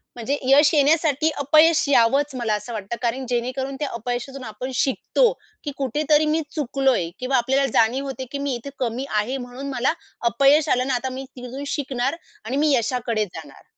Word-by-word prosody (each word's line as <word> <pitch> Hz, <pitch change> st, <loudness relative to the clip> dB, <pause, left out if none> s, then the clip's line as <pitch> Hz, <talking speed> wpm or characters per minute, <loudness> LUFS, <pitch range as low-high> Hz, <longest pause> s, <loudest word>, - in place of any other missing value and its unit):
म्हणजे 255 Hz, +4 st, -2 dB
यश 285 Hz, +4 st, +6 dB
येण्यासाठी 305 Hz, 0 st, +3 dB
अपयश 310 Hz, +3 st, +5 dB
यावंच 275 Hz, +3 st, +3 dB
मला 230 Hz, -4 st, -1 dB
असं 210 Hz, +3 st, -6 dB
वाटतं 210 Hz, +1 st, -4 dB
कारण 250 Hz, +2 st, -1 dB
जेणेकरून 255 Hz, +3 st, -2 dB
त्या 295 Hz, -, -1 dB
अपयशातून 245 Hz, +3 st, -4 dB
आपण 225 Hz, +5 st, -6 dB
शिकतो, 325 Hz, -, +2 dB, 0.3 s
की 290 Hz, -, -3 dB
कुठेतरी 295 Hz, +3 st, +2 dB
मी 320 Hz, -, +1 dB
चुकलोय 270 Hz, -, +1 dB
किंवा 260 Hz, +1 st, +1 dB
आपल्याला 265 Hz, +3 st, +2 dB
जाणीव 240 Hz, +5 st, +2 dB
होते, 265 Hz, -1 st, -5 dB
की 280 Hz, -, -3 dB
मी 280 Hz, -2 st, -1 dB
इथे 240 Hz, +4 st, -7 dB
कमी 250 Hz, +1 st, -2 dB
आहे 245 Hz, +6 st, -2 dB
म्हणून 255 Hz, +2 st, -7 dB
मला 255 Hz, +3 st, +1 dB, 0.4 s
अपयश 280 Hz, +5 st, +4 dB
आलं 250 Hz, -, +3 dB
आणि 265 Hz, -, -2 dB
आता 255 Hz, +1 st, -1 dB
मी 265 Hz, +1 st, -6 dB
तिथून 250 Hz, +3 st, -7 dB
शिकणार 270 Hz, -1 st, -2 dB, 0.3 s
आणि 255 Hz, +4 st, -2 dB
मी 300 Hz, +1 st, +3 dB
यशाकडे 235 Hz, -2 st, 0 dB
जाणार. 180 Hz, -, -12 dB
265 Hz, 175 wpm, -23 LUFS, 245-280 Hz, 0.4 s, यश